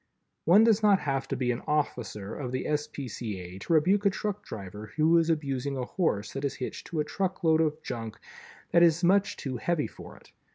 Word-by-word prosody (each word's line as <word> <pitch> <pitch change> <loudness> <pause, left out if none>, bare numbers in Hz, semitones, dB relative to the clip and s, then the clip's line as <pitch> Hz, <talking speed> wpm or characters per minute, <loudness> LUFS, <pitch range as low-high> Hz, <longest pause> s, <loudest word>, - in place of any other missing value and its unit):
One 190 +7 +7
does 225 -2 +4
not 205 -3 +4
have 135 -2 -1
to 135 - -2
be 125 -1 0
an 120 - -3
officer 110 -9 -2
of 130 -4 -5
the 130 0 -2
S. 150 0 0
P. 140 -3 -7
C. 105 -3 -5
A. 90 +1 -9
to 135 - -1
rebuke 185 +6 +4
a 200 - +5
truck 205 +1 -3
driver 105 +1 -8
who 160 +2 +4
is 165 0 +1
abusing 140 -3 -1
a 125 - -2
horse 115 - -1
that 135 - -4
is 140 - -1
hitched 130 - -6
to 165 -4 -1
a - - -2
truckload 175 -3 +1
of 155 -1 0
junk 115 -2 -5 0.5
that 170 - +5
is 170 +1 +4
much 195 +3 +3
too 130 -3 -4
heavy 160 +3 0
for - - -11
it. - - -20
150 Hz, 220 wpm, -28 LUFS, 125-175 Hz, 0.5 s, One